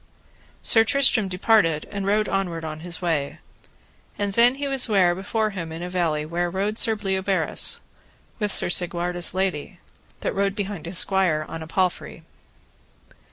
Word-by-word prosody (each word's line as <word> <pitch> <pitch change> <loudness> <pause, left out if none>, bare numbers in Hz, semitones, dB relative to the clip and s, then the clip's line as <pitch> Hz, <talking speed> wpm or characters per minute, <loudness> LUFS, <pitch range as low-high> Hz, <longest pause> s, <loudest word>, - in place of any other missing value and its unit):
Sir 225 - +5
Tristram 250 -4 +3
departed 180 -4 +2
and 200 -1 -4
rode 210 +1 +2
onward 175 -4 -2
on 155 0 -6
his 175 +1 -1
way. 155 -5 -1 0.8
And 200 -1 -2
then 245 +5 +4
was 270 -2 +1
he - - -6
ware 185 -4 +4
before 215 +4 -2
him 170 -5 -6
in 165 +2 -6
a 180 - -5
valley 165 -4 -1
where 175 +2 -2
rode 200 +4 -2
Sir 225 -2 +4
Bleoberis, 195 -2 0 0.6
with 210 -2 -1
Sir - - +1
Segwarides' 175 0 0
lady, 185 -1 -2 0.4
that - - -2
rode 195 0 0
behind 200 -5 -5
his 175 +1 -1
squire 185 -6 +3
upon 165 +1 -8
a 160 - -8
palfrey. 180 +1 -2
190 Hz, 160 wpm, -23 LUFS, 170-205 Hz, 0.8 s, Sir